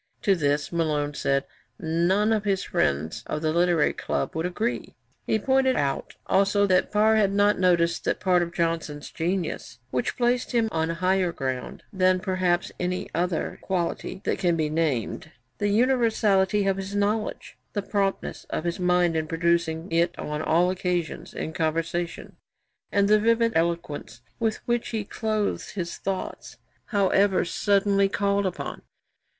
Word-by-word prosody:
To 200 - +4
this, 145 -4 0
Malone 150 -3 0
said, 140 0 0 0.3
none 180 +6 +1
of 215 -1 0
his 195 -2 0
friends 75 +9 -1
of 150 - -3
the 155 0 +1
Literary 170 -2 +3
Club - - -3
would 160 +2 0
agree. 220 +7 -3 0.3
He - - +2
pointed 265 +3 +2
out 140 -1 -2
also 200 +1 +3
that 185 -2 +2
Parr 215 +1 +4
had 200 -2 +3
not 205 0 +3
noticed 170 -2 +2
'that - - 0
part 180 -2 +3
of 170 0 -2
Johnson's 165 -4 -2
genius, 170 -8 -3
which 125 - -1
placed 245 +1 +1
him 230 -2 +2
on 160 0 0
higher 185 +1 +1
ground 130 -5 -4
than 185 -1 +3
perhaps 185 -2 0
any 180 0 -2
other 175 0 -1
quality 185 0 -3
that - - -1
can 175 -2 +2
be 155 -2 -1
named 155 -2 -1 0.3
the 205 - +1
universality 210 -4 +2
of 195 -1 +1
his 195 +1 -5
knowledge, 210 +2 -2
the 205 - -2
promptness 200 -2 -2
of - - -2
his 175 +2 -2
mind 180 -2 +2
in 160 -1 -1
producing 165 0 0
it 170 +1 +1
on 150 0 -4
all 175 +3 +3
occasions 180 -3 -2
in 160 - -5
conversation, 165 +1 -2 0.5
and 200 0 +3
the 215 +1 +5
vivid 230 +1 +3
eloquence 170 -2 -2 0.2
with 225 -2 -1
which 240 -1 0
he 220 -2 -2
clothed 215 -1 -2
his 175 -3 -4
thoughts, 195 -1 -5 0.3
however 200 -2 +2
suddenly 200 +1 +2
called 200 0 +1
upon.' 185 - -5
180 Hz, 155 wpm, -25 LUFS, 165-205 Hz, 0.5 s, the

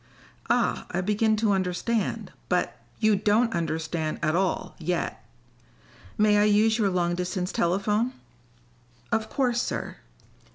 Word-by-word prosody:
"Ah, - - +1
I 175 - -1
begin 210 +3 +2
to 215 -1 +1
understand. 195 +4 -1 0.2
But - - 0
" - - -32
"You 215 -1 +4
don't 215 +4 +2
understand 160 -1 -2
at 155 +1 +2
all, 185 0 0
yet. 175 +1 -2 0.9
May 210 0 +4
I 205 - +4
use 215 +2 +3
your 205 -3 +3
long 175 -2 0
distance 180 +1 -2
telephone?" 210 +7 +1 1.0
"Of 220 -1 0
course, 245 -3 +1
sir." - - -4
200 Hz, 130 wpm, -26 LUFS, 180-220 Hz, 1.0 s, You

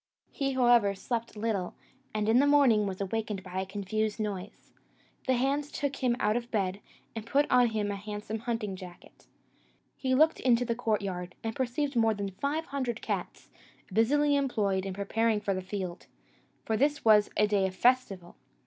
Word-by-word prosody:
He, 275 -1 -1
however, 240 -6 +4
slept 230 +2 -4
little, 210 -4 -2 0.4
and 215 0 -1
in 225 +3 +5
the 285 - +4
morning 260 -8 +4
was 190 0 -5
awakened 210 0 -3
by 185 0 -4
a 190 - -5
confused 210 +2 -2
noise. 205 -2 -5 0.5
The 260 - +3
hands 280 +4 0
took 280 -2 -2
him 245 -2 +1
out 210 +1 +2
of 240 0 -3
bed, 195 -3 -1 0.4
and 225 - -4
put 280 +6 +2
on 250 -1 +6
him 215 -2 -1
a - - -3
handsome 210 +2 -5
hunting 225 -4 -3
jacket. 180 -2 -13 0.7
He 260 -1 0
looked 315 +4 +4
into 245 -1 +3
the 235 - 0
courtyard, 200 -6 -2
and 225 -1 -3
perceived 265 +2 -1
more 225 -2 +3
than 200 -1 -4
five 285 - -2
hundred 255 -5 -3
cats, - - -4 0.4
busily 290 +6 +3
employed 205 -9 0
in 190 - -5
preparing 215 +2 +1
for 200 -1 -1
the 185 - -3
field 185 -2 -5 0.6
for 220 - 0
this 290 +4 +1
was 210 -2 +6
a 210 - +5
day 205 -2 +2
of 185 - -7
festival. 200 -7 +1
220 Hz, 175 wpm, -29 LUFS, 200-250 Hz, 0.7 s, on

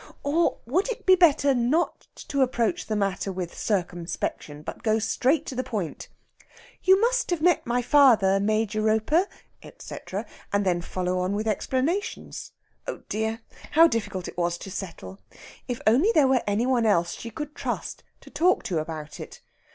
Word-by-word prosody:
Or 320 +4 +1
would 355 - 0
it - - -5
be 375 - +7
better 305 -6 +5
not 260 +8 0 0.2
to 280 -1 0
approach 235 -6 0
the 215 - -1
matter 195 -1 -1
with 180 -2 -5
circumspection, 175 -6 -3
but - - -7
go 220 -1 +2
straight 260 +7 +1
to - - -5
the 255 0 -2
point 210 -10 -4 0.7
"You 380 +1 +5
must - - +1
have 350 -2 0
met 350 -3 +2
my 245 +1 +1
father, 230 -8 +5
Major 215 +1 0
Roper, 220 - +2 0.3
etc.," - - -7 0.3
and 200 0 +1
then 175 -2 +1
follow 180 +1 -2
on 185 +2 -1
with 215 +2 -2
explanations? 265 - -2 0.4
Oh - - -5
dear, 220 +2 -2 0.3
how 325 +2 +8
difficult 210 - -3
it - - -7
was 175 0 0
to 195 - -9
settle! 195 0 -7 0.5
If 245 -2 -3
only 270 - +4
there 295 -4 +6
were 260 -2 +3
any 205 +4 +1
one 225 -9 +3
she 175 +6 -7
could 300 +6 -6
trust - - -4 0.2
to - - -15
talk 345 +6 +2
to 170 -4 -1
about 155 -1 -6
it! - - -9
225 Hz, 165 wpm, -25 LUFS, 195-285 Hz, 0.7 s, how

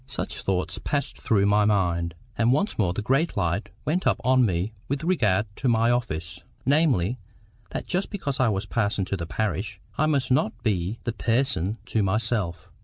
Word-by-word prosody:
Such - - -3
thoughts 95 -1 -1
passed 145 -1 -2
through 100 -3 +3
my 105 +1 +4
mind. 85 -5 +1 0.2
And 115 +3 +3
once 150 - +1
more 95 -5 +3
the 100 +4 -3
great 135 +7 +1
light 90 +2 0 0.2
went 175 +5 +1
up - - +2
on 130 0 +4
me 95 0 0
with 140 +3 -2
regard 110 - +2
to 135 - +1
my 115 0 +3
office, 85 -8 -2 0.3
namely, 130 - +2 0.5
that - - -4
just 185 +2 -1
because 145 -9 -3
I 130 -3 +4
was 100 -1 -1
parson 105 -2 0
to 100 - -2
the 85 -3 -4
parish, 105 0 -2 0.2
I 155 - +4
must 140 -4 +1
not 125 -4 +1
be 100 -1 0
THE 120 - -2
PERSON 115 -5 0
to 110 - 0
myself. 95 -4 -1
110 Hz, 180 wpm, -25 LUFS, 95-130 Hz, 0.5 s, my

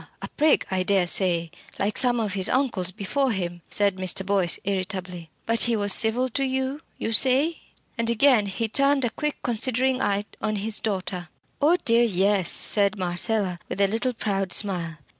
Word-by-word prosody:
a - - -4
prig 305 0 +2
I 190 -1 -1
dare 190 -1 +1
say 175 -2 +1 0.3
like 200 +1 -2
some 245 -2 +5
of 210 -4 -3
his 190 -1 +1
uncles 245 -9 -1
before 235 +9 -2
him," 175 -4 -5
said 200 -2 +2
Mr. 185 +1 -1
Boyce, 190 -3 0
irritably. 185 -3 -4 0.2
"But 230 0 +1
he 235 -1 +3
was 205 -2 +5
civil 235 +3 +1
to 275 +3 -2
you, 265 +2 -3 0.2
you 225 - -4
say?" 270 +8 +3 0.4
And 230 0 0
again 235 -2 +3
he 225 +4 -3
turned 275 +3 +2
a 235 - -2
quick 300 +4 -3
considering 255 +2 +1
eye 200 +1 -1 0.2
on 215 - -2
his 210 +1 +1
daughter. 185 -5 -4 0.3
"Oh 320 +5 +3
dear! 230 +1 +3
yes," 195 -3 +1
said 200 0 +3
Marcella, 185 +1 -1
with - - -6
a 200 - +4
little 230 +5 -2
proud 195 -4 -3
smile. 175 -5 -1
205 Hz, 180 wpm, -23 LUFS, 185-245 Hz, 0.4 s, some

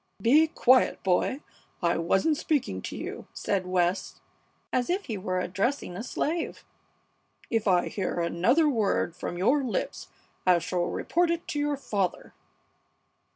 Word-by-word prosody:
"Be 285 +10 +5
quiet, 255 -4 +3
boy! 190 +9 +1 0.4
I 170 -1 +2
wasn't 195 - +2
speaking 275 - -1
to - - -6
you!" - - -6
said 190 -2 -1
West, 180 0 0 0.5
as 250 -1 +1
if 380 +3 0
he 225 - -3
were 185 -2 -2
addressing 195 +3 -1
a 185 - -4
slave. 315 +7 -3 0.9
"If 225 -2 +1
I 180 -2 +3
hear 185 -3 -2
another 185 - +3
word 215 - +1
from 175 - -5
your 250 +10 +3
lips 245 - -3 0.4
I 180 -1 +5
shall 175 +1 -1
report 345 0 0
it 335 0 -2
to 295 - -2
your 290 -1 0
father!" 200 -9 -2
215 Hz, 145 wpm, -27 LUFS, 180-285 Hz, 0.9 s, Be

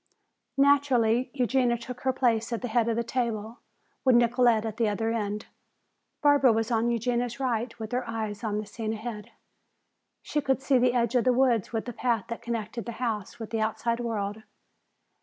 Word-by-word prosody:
Naturally 260 -4 +3
Eugenia 250 -2 +2
took 245 +1 -8
her 265 - +2
place 235 -3 +1
at 235 +1 -3
the - - -1
head 230 0 +1
of 230 - +1
the 235 - 0
table, 230 -2 -3 0.4
with 255 -2 +5
Nicolete 240 -2 +4
at 220 -1 -4
the 230 -3 +2
other 225 +2 -1
end. 210 -1 -2 0.8
Barbara 285 -3 +6
was 225 +1 0
on 230 +1 +2
Eugenia's 240 +1 -1
right, 240 -2 -1
with 220 -2 -6
her 250 -1 -2
eyes 220 -1 -4
on 210 -2 -1
the 215 - -3
scene 220 +1 -4
ahead. 215 -1 -6 0.9
She 295 - -1
could 265 -1 +1
see 270 -2 +3
the 250 0 +3
edge 235 -1 +1
of 245 -2 +3
the 255 - +4
woods 245 -5 +2
with 225 -2 -2
the 245 - -5
path 230 -3 0
that 230 - -5
connected 235 -1 -4
the 235 - -4
house 225 -4 -3
with 225 -2 -7
the 225 -1 -1
outside 230 +2 -1
world. 220 -3 -3
235 Hz, 190 wpm, -27 LUFS, 220-250 Hz, 0.9 s, Barbara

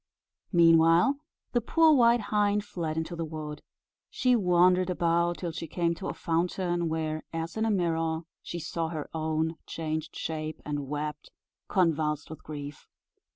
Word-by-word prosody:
Meanwhile, 165 - +5 0.3
the 240 - +2
poor 320 +6 +5
white 240 -3 +5
hind 205 0 +2
fled 160 -5 -4
into 160 +2 -3
the 165 - -3
wood. 150 -2 -6 0.5
She 250 -1 +2
wandered 180 -2 +4
about 170 -1 +1
till 175 -2 -3
she 165 +1 -6
came 170 +1 0
to 185 +3 -6
a - - -2
fountain, 175 +1 0
where, 155 -1 -2
as 165 0 -4
in 220 0 0
a - - +1
mirror, 165 -4 0 0.2
she 175 - -6
saw 165 0 -3
her 155 -2 -5
own 160 0 -1
changed 160 -1 -4
shape, 155 -1 -4
and 145 -2 -3
wept, 150 +1 -4 0.4
convulsed 155 -5 +1
with 160 - -9
grief. 145 -1 -8
165 Hz, 155 wpm, -28 LUFS, 155-180 Hz, 0.5 s, Meanwhile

